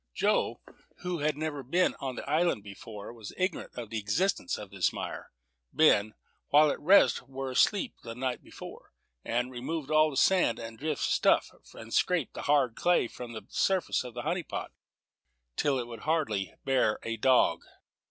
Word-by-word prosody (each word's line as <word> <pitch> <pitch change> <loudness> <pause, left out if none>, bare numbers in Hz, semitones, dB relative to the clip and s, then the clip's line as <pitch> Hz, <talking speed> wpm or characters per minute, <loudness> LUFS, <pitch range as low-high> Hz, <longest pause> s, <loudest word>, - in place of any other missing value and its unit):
Joe, - - +1 0.4
who 180 -2 -2
had 150 0 0
never 155 -2 -3
been 170 +9 +1
on 130 -2 -4
the - - -7
island 155 - +1
before, 105 +2 -9
was 110 -3 -9
ignorant 185 -2 -2
of 115 -3 -7
the 110 - -1
existence 105 - 0
of 100 -3 -9
this 95 -2 +1
mire. - - -6 0.4
Ben, 110 -9 +4 0.3
while 150 +1 +6
the - - -2
rest 165 -7 +5
were 135 0 -4
asleep 205 - +2
the 115 -1 -8
night 125 0 -2
before, - - -12 0.3
had 120 +2 -1
removed 140 +4 -4
all 155 0 +5
the 135 - -6
sand 185 -7 +4
and 115 -1 -8
drift 150 0 -2
stuff, - - +3 0.2
and 115 0 -9
scraped 175 -7 +1
the - - -6
hard 140 -5 +2
clay 175 -8 +2
from 120 0 -9
the 110 - -8
surface 190 -7 +1
of 125 -2 -9
the 120 - -4
honey 180 +1 -1
pot, - - -6 0.8
till 140 -2 +1
it 125 - -2
would 115 -1 -9
hardly 110 - -1
bear 130 -5 +2
a 115 - -2
dog. 130 +3 +3
130 Hz, 175 wpm, -29 LUFS, 115-155 Hz, 0.8 s, while